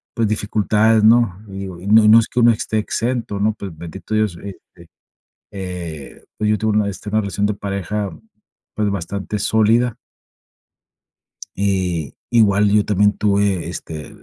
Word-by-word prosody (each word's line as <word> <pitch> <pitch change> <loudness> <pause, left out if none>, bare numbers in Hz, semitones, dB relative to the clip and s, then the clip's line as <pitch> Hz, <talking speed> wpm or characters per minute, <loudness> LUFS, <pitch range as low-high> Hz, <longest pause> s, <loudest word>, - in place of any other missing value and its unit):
pues 115 -3 +1
dificultades, 110 +1 +2
¿no? 110 -3 +3
Y 95 0 -7
digo 95 -3 -7
y 100 - -8
no 105 0 +6
no 110 +2 +8
es 115 - 0
que 125 - -2
uno 120 0 +6
esté 110 0 -2
exento, 115 -2 -2
¿no? 110 +1 +1
Pero, 95 -3 -6
bendito 85 +6 -8
Dios, 105 -5 0
e 100 -2 -7 0.2
e 85 -1 -15 0.7
eh, 90 -7 -7
pues 105 - 0
yo 105 - +3
tuve 110 0 0
una 105 - +3
de 100 - -2
esta 105 +3 -8
una 110 +1 +2
relación 100 0 -1
de 105 - -1
pareja, 100 0 -3 0.6
pues, 105 -1 0
bastante 100 +2 -4
sólida. 110 +3 +2 1.6
Eh, 90 -6 -1 0.2
igual 105 -3 +4
yo 105 -1 +3
también 105 0 +2
tuve, 100 -4 +1
este, 80 -4 -7
105 Hz, 165 wpm, -19 LUFS, 95-110 Hz, 1.6 s, no